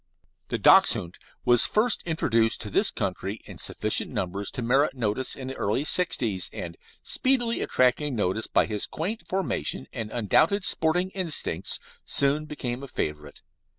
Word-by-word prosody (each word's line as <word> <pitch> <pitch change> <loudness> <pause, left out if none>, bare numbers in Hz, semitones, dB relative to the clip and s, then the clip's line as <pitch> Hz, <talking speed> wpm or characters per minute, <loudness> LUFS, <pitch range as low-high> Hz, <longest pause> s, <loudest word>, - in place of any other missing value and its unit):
The - - -2
Dachshund 85 +1 +4 0.3
was 120 -1 +5
first 220 +2 +2
introduced 115 -8 +1
to 105 - -6
this 205 - +4
country 100 +1 -4
in - - -11
sufficient - - 0
numbers 95 +2 -3
to 125 - -4
merit 135 +5 +2
notice 120 +1 -1
in 130 -2 -7
the 130 - -4
early 105 +7 0
'sixties, 115 - +1
and, 85 -1 -6 0.3
speedily 240 -3 +1
attracting 130 +2 +1
notice 105 +1 -1
by - - +2
his 105 -2 -2
quaint 200 +8 -4
formation 125 - -1
and 110 -2 -4
undoubted 155 - +2
sporting 180 +4 +1
instincts, 160 - -1 0.2
soon 145 +2 0
became 125 -4 -4
a 140 - -7
favourite. 75 - -5
125 Hz, 150 wpm, -26 LUFS, 105-160 Hz, 0.3 s, was